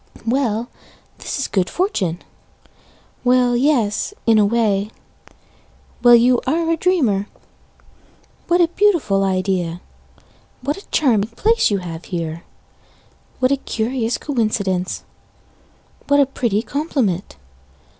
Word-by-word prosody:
Well, 235 -2 0 0.5
this - - -4
is 275 - -2
good 185 -3 0
fortune 195 - -1 1.0
Well, 250 -1 +3
yes 250 - +1
in 225 -2 +5
a 210 - +4
way 210 -2 +1 1.1
Well, 240 -1 +8
you 240 +1 +4
are 330 +4 +1
a - - +3
dreamer! 270 - +1 1.2
What 350 +1 +3
a 340 - +5
beautiful 340 - +2
idea 185 -3 -1 0.8
What 285 +3 -1
a 395 - -13
charming 225 -8 +2
place 445 - +2
you 205 - +1
have 170 -3 -7
here 165 -2 -4 1.0
What 255 0 +1
a 280 - +3
curious 235 -1 -2
coincidence! 205 -9 -1 1.0
What 285 0 +4
a 280 - +5
pretty 235 -5 -1
compliment! 255 - -2
235 Hz, 115 wpm, -19 LUFS, 195-280 Hz, 1.2 s, Well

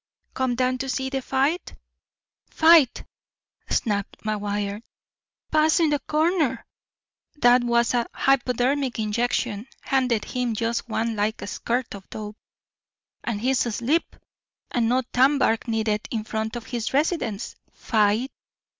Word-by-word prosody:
"Come 260 -2 0
down 255 +1 0
to 270 +1 -3
see 265 +1 -2
the 270 -1 -1
fight?" 275 +7 -1 0.7
"Fight!" 320 -5 +5 0.7
snapped 205 -3 -1
McGuire. 205 -1 -2 0.7
"Puss 310 +2 +4
in 320 -3 +3
the 290 - +1
corner! 310 0 0 0.7
'Twas 240 -2 +4
a 240 -1 +1
hypodermic 265 0 +1
injection. 220 0 -1
Handed 250 -5 +1
him 245 -3 -2
just 230 +2 -2
one 225 0 -1
like 210 +1 -1
a - - -4
squirt 240 +4 -2
of 195 -1 -11
dope, 210 0 -7 0.9
and 215 -3 -3
he's 260 +1 +2
asleep, 240 +9 -1 0.6
and 230 -2 +1
no 255 +2 +2
tanbark 260 -3 +3
needed 220 -2 -1
in 220 -2 -2
front 220 +1 -3
of 235 -1 -6
his 240 +1 -3
residence. 275 - -1 0.2
Fight!" 220 +3 +1
245 Hz, 125 wpm, -24 LUFS, 220-265 Hz, 0.9 s, Fight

